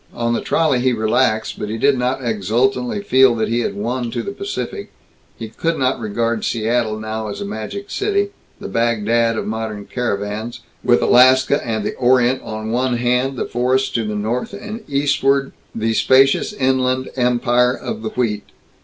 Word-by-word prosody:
On 120 0 0
the - - -1
trolley 155 -6 +1
he 125 0 +2
relaxed. 110 0 0
But 105 - -4
he 110 - -3
did 140 +4 +3
not 125 +1 -1
exultantly 120 - 0
feel 130 -9 +5
that 110 -1 -1
he 115 +1 +1
had 120 - -2
won 120 +4 -2
to 120 0 -3
the - - -4
Pacific; 400 - -5 0.5
he 115 - -6
could 165 +9 -2
not 130 0 0
regard 115 +1 -1
Seattle 115 -1 0
now 110 0 -4
as 100 - -6
a - - -4
magic 110 - -6
city, 405 0 0 0.3
the - - -6
Bagdad 115 0 +1
of - - -2
modern 110 -2 -4
caravans, 110 0 -3 0.2
with 120 - +3
Alaska 130 +3 +5
and 110 -3 -2
the - - -2
Orient 125 +1 +3
on 110 0 -5
one 125 +1 0
hand, 125 +2 0
the - - -1
forests 130 +2 0
to 115 - -1
the 105 -1 -3
north, 110 - -2
and 215 +2 -7
eastward 140 -1 +1 0.2
the 115 0 0
spacious 135 - +4
Inland 130 -6 0
Empire 125 0 +2
of 225 0 -5
the - - -3
wheat. 110 - -2
120 Hz, 175 wpm, -19 LUFS, 110-130 Hz, 0.5 s, feel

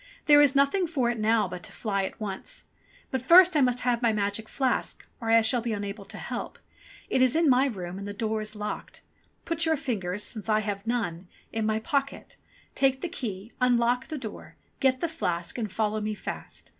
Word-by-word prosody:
"There 290 -1 +8
is 285 -1 +4
nothing 280 +7 +3
for 260 -7 +1
it 235 - -4
now 215 -1 +3
but 180 0 -7
to - - -5
fly 200 -3 -1
at - - -7
once. 210 - -6 0.5
But 260 - -1
first 350 +6 +7
I 295 - +4
must 250 -1 +2
have 245 -1 +1
my 235 -2 +3
magic 210 +1 -2
flask, 265 -2 -1
or 230 - -4
I 230 0 +6
shall 240 +2 +1
be 230 -1 -2
unable 200 0 -5
to - - -9
help. - - -5 0.5
It 260 - +1
is 255 +1 +4
in 325 0 +3
my 260 +1 +5
room 185 -6 -5
and 200 - -6
the - - -4
door 220 +1 -2
is 215 0 -7
locked. 210 0 -6 0.4
Put 330 -1 -1
your 320 -1 +3
fingers, 210 -7 -3
since 220 -1 -6
I 215 0 +3
have 205 0 -4
none, 185 -7 -2 0.3
in 220 -1 0
my 215 0 +1
pocket, 275 +5 -2 0.4
take 270 -1 +2
the 355 - -3
key, 220 - -6
unlock 245 0 +2
the 310 - -4
door, 225 -6 -8 0.2
get 260 -2 +2
the 335 - +1
flask, 175 - -2
and 215 -4 -3
follow 215 0 0
me 210 0 -2
fast. - - -7
230 Hz, 210 wpm, -27 LUFS, 210-265 Hz, 0.5 s, There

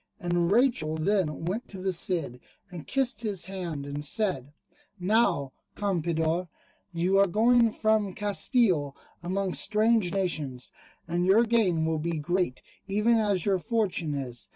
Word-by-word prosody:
And 175 0 0
Rachel 220 - +2
then 165 -3 0
went 205 +8 -3
to 195 - -8
the 190 0 -1
Cid 165 -8 -1 0.3
and 170 -4 -9
kissed 260 -5 0
his 205 -6 -2
hand 175 -7 -5
and 145 +1 -5
said, 150 - -1 0.5
"Now, 180 - +1 0.2
Campeador, 170 -3 -1 0.4
you 180 +3 +1
are 200 - +5
going 230 +4 +3
from 215 -3 0
Castille 200 - +1 0.3
among 185 +1 -2
strange 215 -2 +2
nations, 155 -10 -2 0.4
and 175 +1 -1
your 210 +5 +5
gain 205 -9 +2
will 160 -1 0
be 165 +1 -2
great, 175 -2 -1 0.2
even 210 +4 +2
as 200 -5 +1
your 195 -2 +2
fortune 185 -7 -1
is. 125 -4 -6
185 Hz, 140 wpm, -27 LUFS, 160-210 Hz, 0.5 s, are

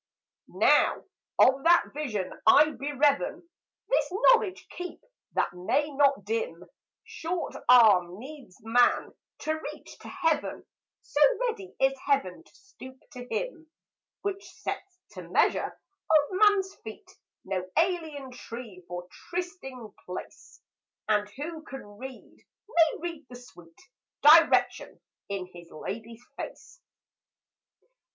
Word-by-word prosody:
Now - - +3 0.3
of 265 +1 +5
that 340 0 +4
vision 230 -11 -3
I 300 +7 +7
bereaven 290 +4 0 0.4
This - - +1
knowledge 425 -1 +3
keep, 360 0 -7 0.3
that - - 0
may 220 +12 0
not 280 -1 +2
dim: 460 +2 -3 0.4
Short 335 +1 -4 0.2
arm 200 -8 +6
needs 265 -5 -11
man 240 +3 +2 0.3
to 310 - 0 0.2
reach - - -14
to - - -12
Heaven, 320 -2 -1 0.4
So - - -2 0.2
ready 445 -6 -3
is 270 0 +3
Heaven 275 - -1
to - - -24
stoop 260 -10 -13
to 250 -3 -9
him; 350 -11 -4 0.5
Which 395 -1 -3
sets, 390 -2 -6
to - - -9
measure - - +2 0.4
of 300 -2 +4
man's 390 -1 +3
feet, 220 -1 -10 0.3
No 185 -1 -3
alien 320 -6 0
Tree 230 -6 -9
for 175 0 -6 0.2
trysting 265 - -6
place; 180 - -9 0.4
And 210 -1 +1
who 310 +8 -7
can 270 -3 -9
read, 260 0 -10 0.3
may 330 -6 +4
read 330 -5 -6
the 250 - -10
sweet 175 -9 -15 0.4
Direction 320 +3 +5 0.3
in 195 -2 -3
his 170 -1 -12
Lady's 225 +8 -8
face. - - -9
280 Hz, 115 wpm, -28 LUFS, 225-340 Hz, 0.5 s, I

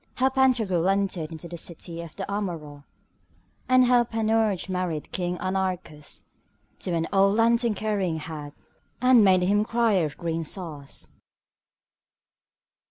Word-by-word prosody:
How 260 +1 +3
Pantagruel 225 -10 +2
entered 195 -5 -1
into 160 +1 -8
the 170 0 -7
city 170 0 -5
of 170 -2 -10
the - - -4
Amaurots, 165 -8 -5 0.8
and 255 0 +6
how 245 -1 +5
Panurge 220 -4 0
married 180 -5 -3
King 180 -1 -2
Anarchus 185 -6 -4 0.5
to 180 - -3
an 165 0 0
old 195 +1 +4
lantern 230 0 +3
carrying 200 -5 -1
hag, 150 -2 -7 0.5
and 250 -2 +6
made 185 -2 +5
him 200 +3 +3
a - - +2
crier 225 -7 +2
of 150 -1 -6
green 165 -1 -2
sauce. 155 -4 -6
185 Hz, 135 wpm, -26 LUFS, 165-220 Hz, 0.8 s, and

